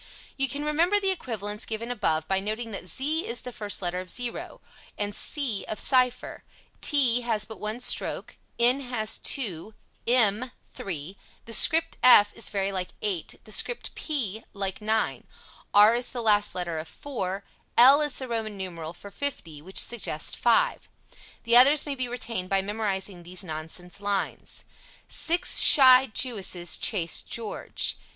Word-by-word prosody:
You 270 -1 0
can 285 +4 -4
remember 340 +7 +2
the 390 -1 0
equivalents 210 - -4
given 230 +2 -4
above 160 -9 -1
by 190 0 0
noting 220 +3 -4
that 195 -3 -6
z 305 - -1
is 465 - -4
the 250 - -7
first 205 -3 -3
letter 175 +1 -2
of 185 0 -6
"zero," 245 +2 -3 0.4
and 205 0 -3
c 265 -9 -1
of 215 - -4
"cipher," 255 -2 +1 0.4
t 255 -5 +3
has 225 -3 0
but 220 +1 -11
one 215 +3 -4
stroke, - - -1 0.2
n 245 +3 +4
has 235 -5 -4
two, 215 - -2 0.3
m 240 0 +2 0.2
three; 175 0 -6 0.3
the 230 - -8
script 325 +7 +4
f 210 -5 +7
is 230 - -4
very 195 -1 -1
like 185 -2 -3 0.2
8; 195 -6 -4
the 215 - -13
script 475 - +1
p 230 - -3
like 195 -1 -4
9; 220 +1 -1 0.4
r 210 +2 +7
is 245 +1 -2
the 240 -2 -5
last 210 -1 +2
letter 175 -3 -3
of 155 - -7
"four;" 200 -8 -5 0.3
l 270 +5 +8
is 295 -2 -1
the 260 - -6
Roman 220 -3 -4
numeral 170 -4 -6
for 200 +4 -12
50, 170 - -5
which 190 +5 -9
suggests 235 -2 -1
5. - - +1 0.5
The 235 0 +2
others 280 +4 +7
may 290 - -3
be 255 -2 -3
retained 230 -6 -5
by 195 -1 +1
memorizing 200 -3 -3
these 180 +2 -6
nonsense 160 +3 -7
lines: 200 -1 -3 0.4
Six 350 +2 +2
shy 260 -1 +8
Jewesses 195 -8 0
chase 170 -7 0
George. 230 -3 -3
220 Hz, 160 wpm, -26 LUFS, 195-255 Hz, 0.5 s, l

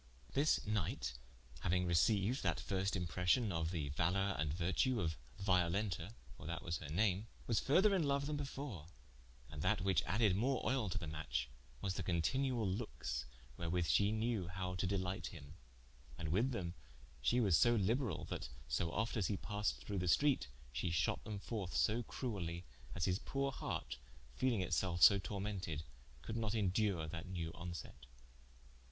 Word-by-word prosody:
This 145 +3 +3
knight 85 - -1 0.5
hauing 90 0 +2
receyued 100 - +3
that - - +1
first 95 0 -1
impression, 90 +5 +2
of 80 -2 0
the 80 -5 -2
valor 95 +6 +1
and 80 -2 +1
vertue 95 - +1
of 80 -4 0 0.2
Violenta 95 0 +1 0.2
(for 70 - -9
that 85 0 -3
was 85 -2 -2
her 75 - -7
name) 100 +5 +1 0.2
was 115 -2 +2
further 190 +9 +4
in 170 -6 +2
loue 140 0 +2
then 150 +2 -2
before: 135 - -5 0.6
and - - -5
that - - +2
which 95 -4 +3
added 105 +1 +3
more 125 +6 +1
oile 110 -3 +1
to 95 - -2
the 90 - -3
matche, 75 -6 -2 0.3
was 95 -2 -1
the 95 - -3
continuall 110 - +1
lookes, 95 - -3 0.3
wherewith 85 0 0
she 100 +4 +4
knew 110 -4 0
how 90 0 -3
to 90 +1 -1
delighte 95 -1 -1
him: 75 -3 -10 0.6
and 80 - -3
wyth 110 - +2
them 90 -9 -3 0.5
shee 120 - +3
was 100 -8 +4
so 120 +7 +5
liberall, 110 - +1
that - - -4 0.2
so 75 +7 0
oft 110 +5 -1
as 100 - +2
he 100 - 0
passed 105 +2 -2
through 100 -2 -2
the 90 - -1
streate 140 - +3 0.2
she 65 +8 -1
shot 80 -2 +1
them 105 -1 -4
forth 100 -2 -4
so 115 +3 +3
cruelly, 90 -9 -4 0.3
as 85 - 0
his 90 +1 +1
poore 135 0 -1
hart 65 - -4 0.4
(feeling 120 - +2
it 90 -2 -2
selfe 85 -1 +2
so 100 - +9
tormented) 95 -5 -3 0.4
could 110 - -4
not 110 -1 -1
indure 100 -4 +1
that 80 +2 -6
new 85 -3 -3
onset. 85 -7 -7
95 Hz, 170 wpm, -38 LUFS, 85-110 Hz, 0.6 s, so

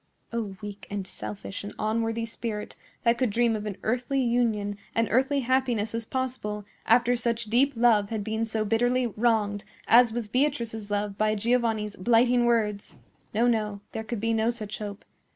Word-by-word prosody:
O, 210 -5 -3
weak, 205 -1 -7
and 200 -1 -3
selfish, 105 - -7
and 205 - -7
unworthy 225 +1 -1
spirit, 225 -2 -5 0.3
that 235 -1 +3
could 255 -3 +2
dream 230 +2 +2
of 210 0 -4
an 200 - -4
earthly 250 +4 0
union 225 -5 +1 0.2
and 230 -1 +2
earthly 270 +4 +2
happiness 245 -4 +1
as 230 0 -2
possible, 235 -5 -3 0.2
after 240 +2 +4
such 235 -1 0
deep 270 +4 +4
love 225 -4 +4
had 220 -2 -2
been 220 +1 -1
so 220 -1 -1
bitterly 245 +4 +2
wronged 215 -3 +1 0.2
as 240 0 +7
was 235 -1 -3
Beatrice's 235 -4 -1
love 205 -1 -2
by 215 0 +2
Giovanni's 225 -1 0
blighting 240 +4 +3
words! 215 -4 0 0.4
No, 230 +3 +3
no; 215 -4 +1
there 220 - -4
could 225 0 -4
be 230 +2 0
no 225 +1 +2
such 215 -3 -4
hope. 205 -1 -7
225 Hz, 170 wpm, -27 LUFS, 210-240 Hz, 0.4 s, as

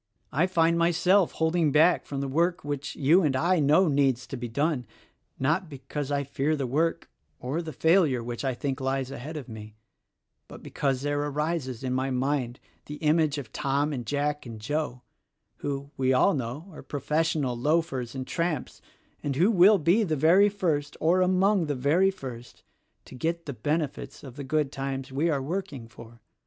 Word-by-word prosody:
I 160 +6 +2
find 170 -2 +2
myself 175 +2 +3
holding 160 -1 +1
back 160 +5 +4
from 140 -1 -4
the 140 - -2
work 170 +6 0
which 145 -1 -4
you 155 +7 +4
and 145 -6 +1
I 170 +6 +2
know 155 +6 +4
needs 135 -4 +2
to - - -7
be 120 -1 -5
done, 140 0 -1 0.5
not 160 +6 0
because 140 0 -5
I 140 0 0
fear 140 +3 -1
the 140 -3 -2
work 155 +7 0 0.3
or 140 +7 -2
the 160 -2 -6
failure 160 -5 +3
which 120 +2 -5
I 130 -2 -1
think 135 +1 -3
lies 135 0 -1
ahead 145 +4 -6
of 140 - -7
me; 110 -2 -10 0.4
— - - -54
but - - -12
because 135 -2 -1
there 145 0 0
arises 145 -4 -2
in 130 -1 -1
my 130 +1 0
mind 130 -1 -1 0.3
the 150 - -6
image 155 -1 +2
of 130 -6 -7
Tom 140 +2 0
and 125 -3 -4
Jack 145 +4 -1
and 115 -2 -8
Joe, 125 +1 -3 0.5
who, 140 0 -4
we 130 0 +2
all 130 +10 +4
know, 140 +5 -4
are 155 - -10
professional 150 -2 -1
loafers 135 -2 -1
and 130 -1 -4
tramps 165 -4 -3 0.4
and 140 -2 -2
who 180 +10 +4
will 200 +1 +6
be 175 +6 +3
the 160 -6 0
very 175 +8 +5
first 160 -8 -2
or 175 +4 +3
among 185 0 +3
the 145 - -1
very 150 +9 +3
first 125 -10 -9 0.4
to - - -13
get 165 +5 -2
the 140 - -5
benefits 145 +4 -3
of 130 -4 -10
the 140 - -6
good 145 +1 0
times 135 -1 -4
we 150 +6 0
are 140 -4 0
working 145 -6 -4
for. 115 0 -14
145 Hz, 185 wpm, -27 LUFS, 130-165 Hz, 0.5 s, will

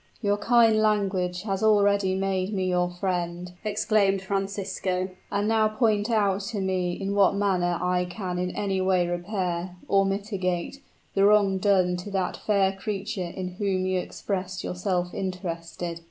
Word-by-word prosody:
"Your 205 -2 +1
kind 225 0 +4
language 195 -4 +1
has 195 -3 -2
already 200 -3 +3
made 190 +1 -1
me 190 -1 0
your 180 -1 +1
friend," 175 -1 -3
exclaimed 205 -2 +1
Francisco. 195 -1 -2 0.2
"And 205 0 0
now 220 -1 +3
point 215 -1 +1
out 205 -3 +2
to 210 0 -3
me 185 -2 0
in 195 +2 -3
what 200 -1 +4
manner 180 -4 +1
I 180 0 +1
can 180 -1 -4
in 180 0 -1
any 195 -2 -1
way 185 -1 +2
repair 175 0 -3
or 195 0 +3
mitigate 195 +2 -2 0.3
the 195 - +2
wrong 200 -2 +4
done 185 -3 +3
to 180 +3 -7
that 190 -2 -1
fair 200 -2 +2
creature 195 -2 -4
in 185 -1 -3
whom 190 -3 0
you 185 0 +1
express 190 0 -4
yourself 180 -1 -2
interested." 170 -2 -4
190 Hz, 155 wpm, -26 LUFS, 180-205 Hz, 0.3 s, kind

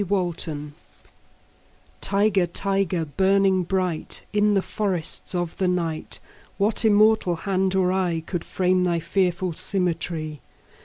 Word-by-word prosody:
The - - -8 0.3
Tiger 150 -2 -4 1.3
TIGER, 200 -2 +2
tiger, 190 -2 0
burning 190 +4 +2
bright 180 -2 -2
In 210 0 +3
the 195 - +2
forests 190 -4 -2
of 175 -2 -2
the 190 - +1
night, 170 -3 -2 0.4
What 210 +3 +1
immortal 215 -4 +4
hand 190 +2 0
or 185 -1 +2
eye 180 -4 0
Could 175 -2 -3
frame 185 0 +1
thy 170 -2 +1
fearful 180 0 0
symmetry? 165 -4 -2
185 Hz, 120 wpm, -24 LUFS, 170-195 Hz, 1.3 s, immortal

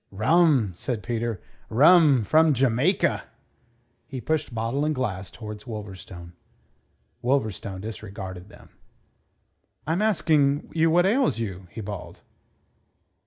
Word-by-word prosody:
"Rum," 130 - +3
said 105 +5 -4
Peter. 115 -4 -3 0.3
"Rum, 145 0 +6
from 155 +6 +4
Jamaica." 135 - +1 0.8
He 135 -3 -6
pushed 155 +2 -2
bottle 115 +5 -2
and 155 0 0
glass 100 -7 -3
towards 105 0 -9
Wolverstone. 95 -5 -8 0.9
Wolverstone 110 -7 -1
disregarded 95 -3 -8
them. - - -16 1.2
"I'm 165 +5 0
asking 155 -9 +2
you 165 0 +3
what 175 +2 +4
ails 245 - +2
you?" 95 -5 -5
he 110 - -8
bawled. 100 -3 -8
120 Hz, 110 wpm, -25 LUFS, 105-155 Hz, 1.2 s, Rum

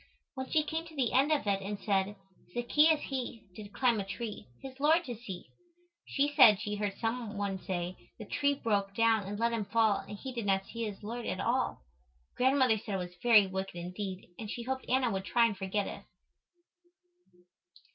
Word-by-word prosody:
When 260 -1 -5
she 310 - +3
came 320 +2 -3
to 320 - -13
the 260 -5 0
end 275 +4 +4
of 300 -6 +2
it 200 -1 +1
and 200 +1 -4
said, 200 0 0 0.4
"Zaccheus 295 +6 +4
he, 250 -4 -4
did 205 +1 -10
climb 240 -1 +2
a - - -1
tree, 210 - -6
his 265 0 -10
Lord 320 +4 +4
to 250 - -4
see." 210 -6 -8 0.6
she 290 +1 +1
said 215 -9 +8
she 210 -1 -3
heard 205 -1 -2
some 225 -2 -3
one 200 -2 -2
say, 180 -1 -3 0.2
"The 215 - -8
tree 285 +6 +1
broke 200 -5 -1
down 225 -3 +3
and 205 +1 -4
let 235 +1 +2
him 220 -3 -1
fall 220 0 +3
and 195 +1 -8
he 260 +4 -6
did 230 -4 -3
not 195 0 +2
see 230 +2 -4
his 205 -1 -7
Lord 235 +3 -5
at - - -2
all." - - 0 0.5
Grandmother 260 -3 +3
said 205 -1 -4
it - - +1
was 180 -1 -6
very 225 -4 +7
wicked 190 0 -4
indeed 185 +2 -5
and 220 -2 -6
she 235 - -4
hoped 260 +1 -3
Anna 255 -1 +2
would 190 -1 -3
try 235 +2 +4
and 225 -3 0
forget 195 +1 -1
it. - - -6
220 Hz, 200 wpm, -31 LUFS, 195-255 Hz, 0.6 s, said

